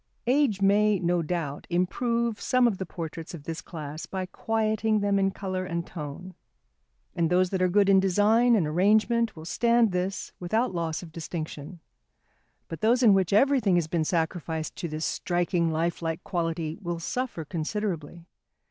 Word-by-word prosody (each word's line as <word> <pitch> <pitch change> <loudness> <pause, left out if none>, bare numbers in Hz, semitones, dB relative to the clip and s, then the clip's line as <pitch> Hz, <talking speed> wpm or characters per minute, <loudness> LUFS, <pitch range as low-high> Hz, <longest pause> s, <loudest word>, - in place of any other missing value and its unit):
Age 245 -6 +2
may, 205 +1 +4
no 175 -1 +1
doubt, 160 -3 -3
improve 230 +6 0
some 255 -1 +3
of 205 -5 -1
the 190 - -4
portraits 165 +1 -6
of 150 - -11
this 165 +1 -5
class 155 -2 -7
by 190 -1 -3
quieting 220 +2 0
them 200 -1 +2
in 195 0 +2
colour 190 -1 -4
and 170 -2 -3
tone. 170 +3 -7 0.8
And 165 -2 +1
those 180 0 +2
that 190 -2 -1
are 185 - +4
good 200 +2 +3
in 195 -1 +6
design 210 +6 +4
and 190 -7 +2
arrangement 215 +8 +2
will 160 0 -10
stand 235 +3 +3
this 185 +2 -2
without 220 +5 0
loss 165 -1 -2
of 165 - -11
distinction, 160 0 -6 0.9
but 165 - -7
those 240 +4 +3
in 215 -4 +7
which 190 -3 +2
everything 230 -3 +4
has 175 -2 +2
been 160 0 -1
sacrificed 160 -1 -2
to 170 - -3
this 155 0 -3
striking 175 -1 0
lifelike 165 0 -2
quality 165 -2 -2
will 175 -2 -3
suffer 230 -2 -3
considerably. 170 -1 -4
180 Hz, 165 wpm, -27 LUFS, 165-210 Hz, 0.9 s, in